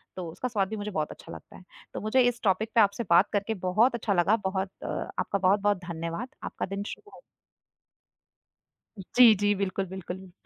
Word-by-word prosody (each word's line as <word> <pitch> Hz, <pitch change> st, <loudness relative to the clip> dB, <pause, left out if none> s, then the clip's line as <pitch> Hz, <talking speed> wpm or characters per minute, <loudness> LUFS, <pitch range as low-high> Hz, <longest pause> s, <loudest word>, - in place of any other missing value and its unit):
तो 175 Hz, -3 st, -5 dB
उसका 255 Hz, -, -4 dB
स्वाद 200 Hz, -5 st, 0 dB
भी 220 Hz, -, -4 dB
मुझे 210 Hz, 0 st, -4 dB
बहुत 155 Hz, -5 st, -2 dB
अच्छा -, -, -12 dB
लगता -, -, -12 dB
है। -, -, -15 dB, 0.3 s
तो -, -, -5 dB
मुझे 215 Hz, +5 st, +2 dB
इस 240 Hz, -1 st, -2 dB
टॉपिक 210 Hz, +3 st, +1 dB
पे 230 Hz, -, +7 dB
आपसे 200 Hz, +3 st, +2 dB
बात 175 Hz, +4 st, +5 dB
करके 205 Hz, +2 st, 0 dB
बहुत 230 Hz, +7 st, +3 dB
अच्छा 220 Hz, -3 st, -1 dB
लगा, 185 Hz, +4 st, +3 dB
बहुत 190 Hz, -2 st, -2 dB
आपका 200 Hz, -, -3 dB
बहुत-बहुत 200 Hz, +2 st, +3 dB
धन्यवाद, 170 Hz, +6 st, -4 dB, 0.2 s
आपका -, -, -4 dB
दिन 195 Hz, +1 st, -4 dB
शुभ -, -, -14 dB
हो। -, -, -15 dB, 1.8 s
हुँ, 195 Hz, -, -8 dB
जी, 240 Hz, -3 st, +9 dB
जी। 205 Hz, +1 st, +2 dB
बिल्कुल, 195 Hz, 0 st, -2 dB
बिल्कुल। 190 Hz, 0 st, -8 dB
200 Hz, 190 wpm, -27 LUFS, 185-215 Hz, 1.8 s, जी